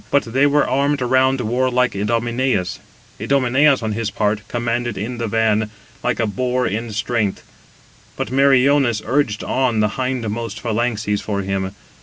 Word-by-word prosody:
But 140 - +3
they 135 +2 +4
were 145 +1 +2
armed 140 +2 +1
around 130 +1 +2
warlike 125 +2 +1
Idomeneus. 115 -1 0 0.4
Idomeneus, 135 0 +3
on 110 - -1
his 110 0 -2
part, 105 0 0
[commanded] 120 -2 -2
in 115 +5 -4
the 115 - -1
van, 110 -1 +1 0.3
like 125 -1 0
a 115 - +2
boar 125 +3 -1
in 115 +3 -3
strength; 105 -1 -1 0.7
but 110 - -4
Meriones 135 -3 +3
urged 120 -3 0
on 130 -4 0
the 105 -1 +2
hindmost 115 -3 -3
phalanxes 110 -2 -1
for 100 -2 -2
him. 95 0 -3
120 Hz, 145 wpm, -20 LUFS, 105-130 Hz, 0.7 s, they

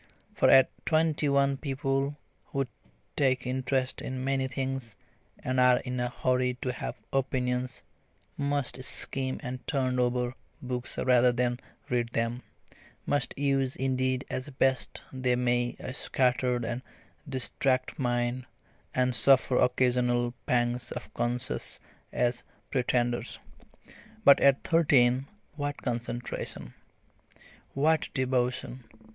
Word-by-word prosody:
For - - +3
at 130 -1 +7
twenty 155 -2 +2
one 140 0 +3
people 135 0 -1 0.3
who 135 0 -1 0.5
take 130 -3 +2
interest 130 0 -1
in 130 0 -4
many 135 0 0
things, 130 -3 -4 0.4
and 130 0 -1
are 125 0 +6
in 125 -1 -4
a 125 0 0
hurry 125 0 0
to 125 - 0
have 125 - -5 0.2
opinions, 125 -1 -1 0.5
must 140 -2 -1
skim 130 0 -1
and 125 +1 -4
"turn 130 -3 0
over" 125 0 +1 0.3
books 125 -1 -4
rather 125 -1 +4
than 120 0 0 0.3
read 120 -1 -1
them, 115 +2 -1 0.6
must 145 -1 0
use 135 -2 +1
indeed 130 0 0
as 130 +3 -4
best 130 -1 0
they 130 -1 +1
may 120 0 +1
a 130 - -6
scattered 125 -2 +1
and 120 +2 -3 0.5
distracted 130 0 0
mind, 120 0 -1 0.5
and 125 0 +2
suffer 130 0 +4
occasional 125 -1 +2
pangs 120 0 +1
of - - -7
conscience 120 +2 -2 0.3
as 120 0 0 0.3
pretenders. 120 -2 0 0.9
But 140 - +8
at 140 -1 +4
thirteen 135 -5 +4 0.3
what 145 0 -3
concentration! 120 - -3 1.0
what 155 +3 +2
devotion! 130 -1 -1
130 Hz, 115 wpm, -29 LUFS, 125-135 Hz, 1.0 s, But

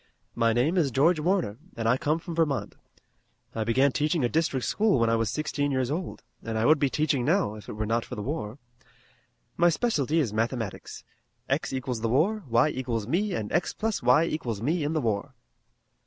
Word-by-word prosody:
"My 115 -1 +2
name 130 +11 +1
is 155 -6 +3
George 155 +7 +3
Warner, 165 - 0 0.2
and 115 -1 -1
I 115 - +4
come 150 +4 0
from 170 +1 -7
Vermont. 160 -5 0 0.8
I 110 - -1
began 130 +5 +3
teaching 150 +2 0
a - - 0
district 150 -5 0
school 210 -6 +2
when 115 0 +2
I - - +3
was 115 -2 0
sixteen 145 +2 -1
years 130 -1 0
old, 175 +3 -4 0.2
and 115 -1 -4
I 110 - +1
would 155 +2 +5
be 140 - +2
teaching 145 -3 0
now, 165 - +1
if 105 -1 -11
it - - -5
were 110 +1 -3
not 115 +2 0
for - - -8
the 105 - -5
war. 130 -4 -4 1.0
My 175 0 +5
specialty 160 - 0
is 120 -9 0
mathematics. 115 -2 -3 0.4
X - - -1
equals 130 -3 -3
the 115 - 0
war, 190 - +2
y 120 +5 +4
equals 120 -6 -3
me 185 - 0
and 105 -2 -4
x - - 0
plus 220 -1 -2
y 125 +6 +5
equals 125 -10 -3
me 155 - 0
in 150 +2 -1
the 155 - 0
war." 105 -4 -2
135 Hz, 205 wpm, -27 LUFS, 115-160 Hz, 1.0 s, would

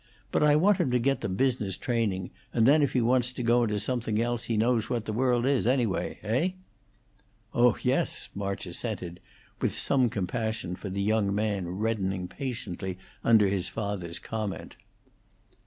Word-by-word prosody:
But - - +1
I 150 -1 +5
want 190 +6 +4
him - - +2
to 125 - +3
get 135 +3 +1
the - - -2
business 110 -2 0
training, 105 -7 -1 0.2
and 115 -2 +3
then 145 +4 +6
if 140 - +1
he 125 - +3
wants 125 +1 +2
to 125 - -4
go 120 +1 +4
into 105 -2 -1
something 110 -1 -1
else 120 0 -1
he 115 - -1
knows 115 0 +2
what 115 -2 -1
the 110 - -3
world 120 +1 +2
is, 135 -4 +2
anyway. 120 -6 +1
Heigh?" 145 - 0 1.0
"Oh 120 -1 +4
yes!" - - 0
March 100 -1 -3
assented, 90 -2 -4 0.4
with - - 0
some 130 -3 +2
compassion 110 -1 -2
for 100 - -7
the 100 +1 -2
young 105 -1 +1
man 100 -4 -1
reddening 95 -1 -1
patiently 95 -8 -5 0.3
under 110 -3 +5
his 95 -2 -1
father's 100 -6 -3
comment. 110 -3 -5
110 Hz, 170 wpm, -28 LUFS, 100-125 Hz, 1.0 s, then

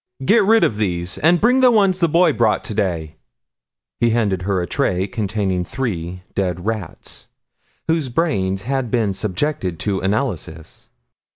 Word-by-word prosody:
"Get 215 +5 +5
rid 225 +3 +4
of 105 - +1
these 90 -4 -2
and 170 +4 +4
bring 250 +4 +4
the 255 -1 +6
one 205 -5 +4
the 180 -2 0
boy 170 +3 +4
brought 115 -3 +1
today." 85 -7 -2 0.8
He 120 - +3
handed 105 -5 0
her 95 0 0
a 90 - -1
tray 90 +3 0
containing 100 -3 -2
three 90 -6 -4
dead 90 -2 -2
rats, 110 -6 -5 0.6
whose 160 -4 0
brains 100 - -1
had 130 0 -2
been 110 -4 +1
subjected 95 - -2
to 100 -3 -1
analysis. 95 - -3
105 Hz, 150 wpm, -20 LUFS, 90-145 Hz, 0.8 s, the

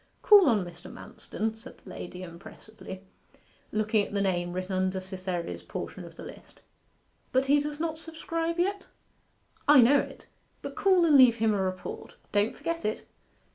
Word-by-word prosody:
'Call 405 -7 +8
on 210 -6 +2
Mr. 175 0 -11
Manston,' 220 +1 -5
said 225 - -12
the - - -13
lady 180 +1 -8
impressively, 190 +2 -11 0.7
looking 215 0 +1
at - - -13
the - - +1
name 175 -3 0
written 185 +2 -4
under 185 0 0
Cytherea's 185 -2 -5
portion - - -7
of - - -13
the - - -10
list. - - -13 0.7
'But 260 +1 +2
he 285 +2 +4
does 295 +1 -4
not 320 -1 -2
subscribe 330 +1 -3
yet?' 390 +3 -1 0.8
'I 290 -2 +8
know 275 +4 +6
it; - - -6 0.4
but - - -5
call 375 -3 +4
and 305 -3 +5
leave 255 -4 +8
him 220 -1 +2
a 200 - 0
report. 185 -1 -5 0.2
Don't 205 +2 +1
forget 335 0 -4
it. 215 - -3
220 Hz, 170 wpm, -28 LUFS, 185-300 Hz, 0.8 s, Call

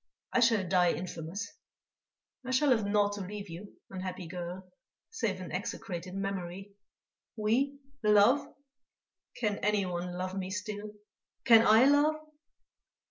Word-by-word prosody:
I - - +4
shall 225 -6 +3
die 180 -1 +3
infamous; 175 +4 -5 0.9
I 255 - -7
shall 260 +2 +3
have 220 -5 +2
naught 205 0 +2
to 205 - -5
leave 200 0 -7
you, 185 +5 -9 0.2
unhappy 185 -1 -5
girl, 180 +2 -6 0.4
save 215 - -2
an 185 - -7
execrated 185 -3 -5
memory.... 195 0 -4 0.6
We, 245 +6 +1 0.2
love? 210 +5 +4 0.9
Can 210 -4 -1
anyone 180 -4 -1
love 185 +1 -3
me 190 -1 -3
still?... 210 +1 -5 0.5
Can 230 -2 +7
I 220 +4 +7
love?" 290 +2 +4
205 Hz, 125 wpm, -31 LUFS, 185-225 Hz, 0.9 s, Can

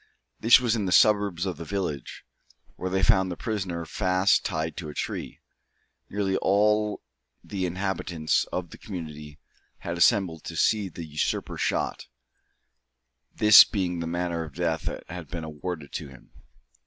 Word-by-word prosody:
This 120 +3 +7
was 120 -3 +1
in 105 -3 -1
the 90 - -1
suburbs 100 -3 +4
of 95 -2 -3
the - - -6
village, 85 -6 -4 0.5
where 95 - -4
they 95 +1 0
found 95 +1 +4
the 90 - -5
prisoner 95 -6 -3
fast 95 +3 +2
tied 80 -3 -2
to 80 -4 -5
a 75 - -9
tree. - - -4 0.7
Nearly 95 -1 0
all 105 +2 +2 0.4
the 95 -3 -3
inhabitants 90 -3 -1
of 85 -2 -5
the - - -12
community 75 -6 -8 0.4
had 85 0 -4
assembled 90 -5 +3
to - - -6
see 105 -3 +2
the 85 -1 -8
usurper 75 -1 -2
shot, - - -1 1.3
this 105 -1 +9
being 90 -4 -2
the 85 - -3
manner 85 0 -2
of 75 -3 -11
death 80 -3 -1
that - - -4
had 90 -3 -8
been 85 +3 -6
awarded 80 -1 -6
to - - -5
him. 65 -3 -16
90 Hz, 155 wpm, -26 LUFS, 80-100 Hz, 1.3 s, this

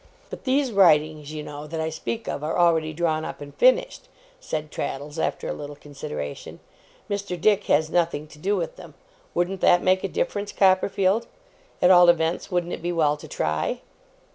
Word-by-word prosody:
'But - - -8
these 265 0 +1
writings, 155 -6 +3
you 155 -1 -5
know, 150 +1 -8
that 160 +1 -5
I 160 0 -2
speak 225 +8 -5
of, 145 - -4
are 155 - -1
already 165 -3 +3
drawn 155 -1 -1
up - - -6
and 145 0 -10
finished,' - - +2 0.3
said 155 - -5
Traddles 145 +3 -5
after - - -2
a - - -2
little 145 0 -8
consideration. 135 - -7 0.5
'Mr. 200 -3 -3
Dick 210 +2 +3
has 155 +2 +2
nothing 165 -4 0
to 150 - -15
do 200 +6 0
with - - -3
them. - - -12 0.4
Wouldn't 180 +2 -1
that 175 0 +5
make 185 0 +3
a - - 0
difference, 420 - -2
Copperfield? 195 +2 +2 0.6
At 180 - +7
all 175 -1 +8
events, 165 +1 +1
wouldn't 175 -2 -1
it - - -5
be 175 +1 -2
well 155 -4 +2
to 150 +1 -12
try? 75 - -2
170 Hz, 185 wpm, -24 LUFS, 150-195 Hz, 0.6 s, all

